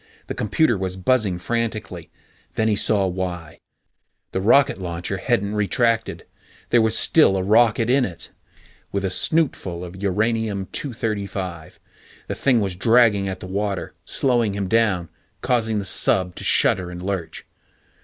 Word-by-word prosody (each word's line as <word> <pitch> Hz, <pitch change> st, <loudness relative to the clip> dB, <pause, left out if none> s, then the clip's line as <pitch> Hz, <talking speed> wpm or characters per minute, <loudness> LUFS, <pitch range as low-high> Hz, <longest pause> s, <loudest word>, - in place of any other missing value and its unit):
The -, -, -5 dB
computer 140 Hz, -, +1 dB
was 95 Hz, -1 st, -3 dB
buzzing 100 Hz, -2 st, +1 dB
frantically. 110 Hz, -3 st, -4 dB, 0.5 s
Then 110 Hz, -, +1 dB
he 105 Hz, -, +2 dB
saw 100 Hz, -1 st, +1 dB
why. 90 Hz, -3 st, -5 dB, 0.7 s
The 95 Hz, -, -2 dB
rocket 120 Hz, 0 st, +4 dB
launcher 85 Hz, -1 st, -4 dB
hadn't 100 Hz, +1 st, -1 dB
retracted; 115 Hz, +2 st, 0 dB, 0.5 s
there 120 Hz, -, +5 dB
was 110 Hz, 0 st, +3 dB
still 125 Hz, -12 st, +4 dB
a 95 Hz, -, -1 dB
rocket 115 Hz, +2 st, +3 dB
in 130 Hz, +2 st, +3 dB
it 90 Hz, -8 st, -6 dB, 0.6 s
with 100 Hz, 0 st, -2 dB
a 95 Hz, -, -1 dB
snootful 95 Hz, -, 0 dB
of 90 Hz, +2 st, -10 dB
Uranium 105 Hz, 0 st, -1 dB
235. 100 Hz, -, -4 dB, 0.5 s
The -, -, -3 dB
thing 125 Hz, -5 st, +2 dB
was 95 Hz, -3 st, -2 dB
dragging 110 Hz, -1 st, +3 dB
at 95 Hz, -1 st, -6 dB
the -, -, -7 dB
water, 100 Hz, 0 st, -3 dB
slowing 120 Hz, -6 st, 0 dB
him 100 Hz, -2 st, -2 dB
down, 105 Hz, -6 st, +1 dB, 0.3 s
causing 115 Hz, -3 st, 0 dB
the 100 Hz, -, -3 dB
sub 90 Hz, 0 st, +1 dB
to -, -, -6 dB
shudder 90 Hz, -2 st, +2 dB
and 90 Hz, 0 st, -8 dB
lurch. 95 Hz, -4 st, -4 dB
100 Hz, 145 wpm, -22 LUFS, 95-115 Hz, 0.7 s, there